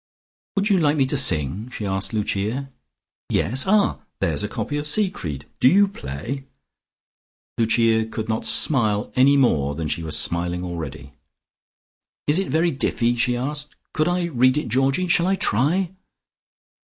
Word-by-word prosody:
"Would 200 +1 +1
you 190 - +4
like 150 -2 +2
me 135 - +3
to 135 - -1
sing?" 95 - +2
she 110 -4 -6
asked 95 0 -2
Lucia. 110 +5 -2 0.6
"Yes? 130 +6 +1
Ah, 205 +1 +2 0.2
there's 75 -4 0
a - - -2
copy 145 +7 -4
of 145 0 -4
Siegfried. 95 - -1
Do - - +5
you 200 +5 +5
play?" 130 - -6 1.1
Lucia 115 -1 +2
could 110 -1 -5
not 110 0 -2
smile 110 -8 +2
any 135 +2 +5
more 70 - +2
than 80 0 -3
she 80 - -3
was 80 -2 -1
smiling 85 +3 -1
already. 75 -5 -7 1.1
"Is 150 +5 +3
it 195 - -2
very 165 +4 +1
diffy?" 120 -3 0
she 120 +1 0
asked. 145 +4 -4 0.2
"Could 155 - +1
I 175 0 0
read 130 -5 +2
it, 150 - -2
Georgie? 135 +9 +1
Shall 175 0 +2
I 195 - +2
try?" 170 - +1
125 Hz, 155 wpm, -22 LUFS, 95-150 Hz, 1.1 s, Do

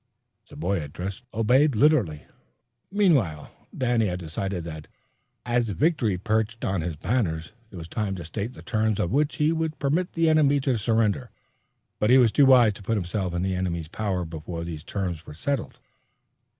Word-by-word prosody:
The 145 - -13
boy 100 - -1
addressed 90 - -6
obeyed 125 +6 +3
literally. 105 - +3 0.7
Meanwhile 145 - +2 0.3
Danny 120 -4 +2
had 90 -1 -2
decided 90 +2 -4
that, 80 -2 -8 0.6
as 120 -1 +1
victory 120 - +1
perched 110 +3 -1
on 95 -3 0
his 85 -1 -3
banners, 85 - -1 0.2
it 100 - -13
was 85 -2 -7
time 100 +1 -2
to 85 -3 -7
state 105 +8 -4
the - - -12
terms 110 -2 0
on 85 - 0
which 145 +3 +1
he 150 +1 +2
would 160 -1 -2
permit 155 +6 0
the 165 -1 +2
enemy 150 -3 +4
to 130 -2 +1
surrender, 115 +2 +1 0.7
but 105 - +2
he 130 - +7
was 120 -4 +5
too 140 +2 +5
wise 120 -5 +6
to 100 - -12
put 110 +3 -1
himself 90 -1 -2
in 85 - -1
the 95 0 0
enemy's 85 -3 -2
power 95 0 -2
before 85 +1 -6
these 80 -3 -6
terms 90 -5 -4
were 75 - -9
settled. 140 - -3
105 Hz, 175 wpm, -25 LUFS, 90-130 Hz, 0.7 s, he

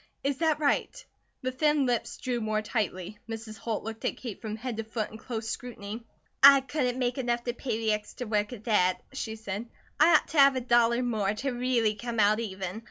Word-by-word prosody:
Is 275 -1 0
that 320 -2 +2
right?" 315 - 0 0.4
The 255 - -1
thin 295 +1 +2
lips 245 -2 -1
drew 245 -2 -2
more 215 0 -1
tightly. 205 -3 -3
Mrs. 220 -1 -7
Holt 225 -2 -3
looked 225 0 -7
at - - -1
Kate 235 -6 -7
from 215 -2 -4
head 235 0 -5
to 225 - -2
foot 220 -1 -4
in 220 - -10
close 225 -2 -5
scrutiny. 230 -1 -6 0.3
"I 275 0 +10
couldn't 260 -3 -1
make 250 0 -1
enough 240 -1 0
to 240 - -2
pay 250 -2 -3
the 220 -1 +1
extra 210 +4 -5
work 210 0 0
at 230 -4 -8
that," 185 -5 +3 0.2
she 220 -4 -4
said. 220 +1 -5 0.3
"I 325 +3 +7
ought - - +3
to 315 - +1
have 275 -1 +7
a - - +1
dollar 240 0 +3
more, 215 -4 0
to 270 +5 -2
really 245 -3 +1
come 235 +1 -4
out 210 +1 +4
even. 190 -2 -4
235 Hz, 215 wpm, -28 LUFS, 215-255 Hz, 0.4 s, I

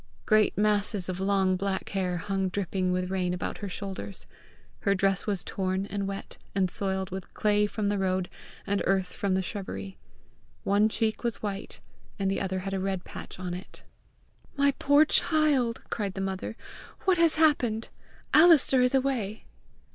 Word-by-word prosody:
Great 215 -1 +3
masses 205 -2 +1
of 185 0 -3
long 190 -1 +2
black 195 +1 -2
hair 185 -3 -1
hung 195 +2 -1
dripping 185 -1 -1
with 180 0 -1
rain 180 -2 0
about 180 - -4
her 205 - -4
shoulders. 185 - -6 0.5
Her 200 - +2
dress 195 +1 +1
was 200 -4 -1
torn 190 0 -2
and 200 -1 -3
wet, 195 0 -6 0.2
and 190 -2 +2
soiled 190 -2 -1
with 190 0 -6
clay 210 -1 +2
from 210 0 -2
the 205 -1 0
road 185 -1 0 0.4
and 200 0 0
earth 190 -2 +1
from 195 -2 0
the 190 - +1
shrubbery. 95 - -6 0.6
One 205 +2 +3
cheek 220 +1 -1
was 235 -2 -2
white, 200 -1 -5 0.4
and 195 -2 0
the 195 - -1
other 190 -1 -2
had 195 +1 -4
a 195 - 0
red 190 -1 -2
patch - - -9
on 180 -1 -4
it. 180 +2 -9 0.7
"My 280 0 +4
poor 285 +2 +5
child!" 295 -8 +2
cried 200 -4 -2
the - - -4
mother; 195 +3 -4 0.4
"what 370 -3 +2
has 335 -2 +5
happened? 255 -8 +2 0.4
Alister 310 -5 +7
is 250 +1 +3
away!" 250 -6 -1
195 Hz, 170 wpm, -28 LUFS, 190-215 Hz, 0.7 s, Alister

